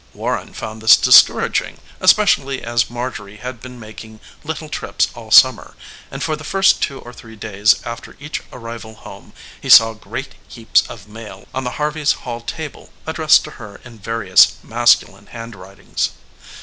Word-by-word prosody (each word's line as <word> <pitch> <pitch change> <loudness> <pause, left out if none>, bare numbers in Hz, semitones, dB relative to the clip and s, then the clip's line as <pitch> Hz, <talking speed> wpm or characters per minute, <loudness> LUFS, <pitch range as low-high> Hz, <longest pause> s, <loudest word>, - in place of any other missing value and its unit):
Warren - - -4
found 110 0 -7
this 110 -2 +7
discouraging, - - +4 0.2
especially 185 -9 +2
as 120 0 -1
Marjorie 120 -4 -7
had 125 +1 -8
been 125 -1 -11
making 110 0 -12 0.2
little - - -6
trips - - -2
all - - -12
summer, - - +5 0.3
and 135 +1 -6
for 155 - -1
the 155 - -12
first 195 +4 +2
two 140 - -2
or 120 - -12
three 115 -2 -14
days 105 -1 +1
after 120 0 -8
each 150 +1 -6
arrival 115 -2 -9
home - - -14 0.3
he - - -7
saw 115 0 +8
great 110 - -8
heaps 115 -1 +1
of 105 -3 -11
mail 105 -3 -12
on 130 0 -4
the 125 - -5
Harveys' 150 0 0
hall 120 -1 -5
table 150 +5 -8
addressed 160 -1 +3
to 150 - -10
her 100 -1 -11
in 120 -2 -14
various 105 -3 +3
masculine 120 +1 +1
handwritings. 100 -4 -6
115 Hz, 160 wpm, -18 LUFS, 110-135 Hz, 0.3 s, saw